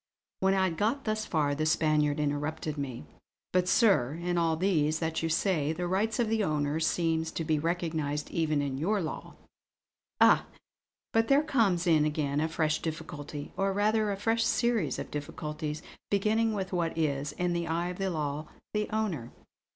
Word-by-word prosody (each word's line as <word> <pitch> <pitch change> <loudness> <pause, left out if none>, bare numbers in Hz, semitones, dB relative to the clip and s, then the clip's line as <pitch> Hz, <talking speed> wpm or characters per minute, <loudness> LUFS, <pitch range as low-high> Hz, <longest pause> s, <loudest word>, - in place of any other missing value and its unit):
When 190 0 +3
I 190 - +3
had 170 -4 0
got 235 - 0
thus 215 0 -1
far 150 -3 +1
the 155 +2 0
Spaniard 155 -2 +2
interrupted 150 +1 -2
me: 135 - -5 0.5
"But 180 0 +2
sir, 180 - +4
in 175 +1 -2
all 165 -2 +2
these 160 -4 +2
that 160 0 -2
you 165 - -1
say, 160 -3 +1
the 175 +2 -3
rights 205 +5 0
of 240 - +1
the 220 -1 +1
owner 150 -2 0
seem 160 0 +1
to 165 0 -4
be 155 -1 +1
recognised 160 -3 -2
even 155 -3 +1
in 135 -1 -3
your 200 +7 +1
law." 160 -4 -5 0.8
"Ah, - - +5 0.7
but 225 0 +3
there 280 +2 +4
comes 215 - +2
in 160 -3 +4
again 150 -1 0
a 160 - +1
fresh 155 -1 0
difficulty; 150 -2 -6
or 195 0 0
rather 210 +1 +2
a 200 - -2
fresh 225 +3 +1
series 235 - +1
of - - -6
difficulties, 150 +1 -5 0.3
beginning 220 +3 +2
with 190 -2 -3
what 170 -2 -1
is, 145 -2 -1
in 180 +1 -1
the 170 0 -1
eye 170 +2 -1
of 180 - -7
the 195 0 0
law, 150 -2 -3 0.3
the 210 0 -1
'owner.' 190 - -2
165 Hz, 180 wpm, -29 LUFS, 150-195 Hz, 0.8 s, Ah